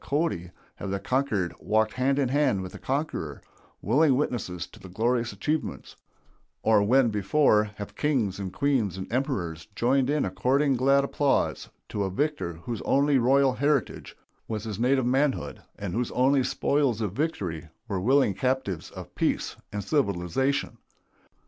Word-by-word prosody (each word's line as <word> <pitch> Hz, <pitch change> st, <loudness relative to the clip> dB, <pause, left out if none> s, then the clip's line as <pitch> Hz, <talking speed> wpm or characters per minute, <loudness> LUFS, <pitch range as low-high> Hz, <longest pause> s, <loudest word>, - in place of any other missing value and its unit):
Cody, 140 Hz, -, -1 dB, 0.3 s
have 100 Hz, -, -5 dB
the 100 Hz, 0 st, -2 dB
conquered 105 Hz, -5 st, 0 dB
walked 110 Hz, 0 st, +1 dB
hand 135 Hz, +2 st, +1 dB
in 135 Hz, -3 st, +1 dB
hand 135 Hz, -9 st, +2 dB
with 90 Hz, -, -7 dB
the -, -, -10 dB
conqueror, 135 Hz, -, -3 dB, 0.4 s
willing 145 Hz, -1 st, +4 dB
witnesses 100 Hz, -, -2 dB
to -, -, -17 dB
his 95 Hz, -, -12 dB
glorious 115 Hz, +3 st, 0 dB
achievements; 150 Hz, +11 st, -3 dB, 0.7 s
or 110 Hz, -2 st, +4 dB
when, 120 Hz, +4 st, +4 dB
before, 105 Hz, +2 st, +3 dB
have 100 Hz, -1 st, -7 dB
kings 125 Hz, -11 st, 0 dB
and 95 Hz, -2 st, -4 dB
queens 125 Hz, -10 st, 0 dB
and 95 Hz, -, -4 dB
emperors 85 Hz, -, -2 dB
joined 130 Hz, +3 st, +2 dB
in 150 Hz, 0 st, +1 dB
according 130 Hz, +10 st, +1 dB
glad 135 Hz, +2 st, +3 dB
applause 140 Hz, 0 st, 0 dB, 0.2 s
to 100 Hz, -, -2 dB
a 95 Hz, -, -1 dB
victor 145 Hz, -, -1 dB
whose 115 Hz, -1 st, -4 dB
only 140 Hz, 0 st, +3 dB
royal 135 Hz, +2 st, +4 dB
heritage 145 Hz, 0 st, -1 dB, 0.3 s
was 110 Hz, -2 st, -3 dB
his 110 Hz, -2 st, -5 dB
native 130 Hz, +1 st, +2 dB
manhood, 135 Hz, +2 st, 0 dB, 0.2 s
and 100 Hz, -4 st, -5 dB
whose 120 Hz, +1 st, -1 dB
only 130 Hz, +1 st, +3 dB
spoils 140 Hz, -4 st, +1 dB
of 105 Hz, -4 st, -1 dB
victory 90 Hz, -, -3 dB, 0.2 s
were 100 Hz, -4 st, -2 dB
willing 130 Hz, 0 st, +3 dB
captives 115 Hz, -5 st, -2 dB
to -, -, -8 dB
peace -, -, -2 dB, 0.2 s
and 105 Hz, -1 st, -4 dB
civilization. 110 Hz, -, 0 dB
125 Hz, 155 wpm, -27 LUFS, 100-140 Hz, 0.7 s, willing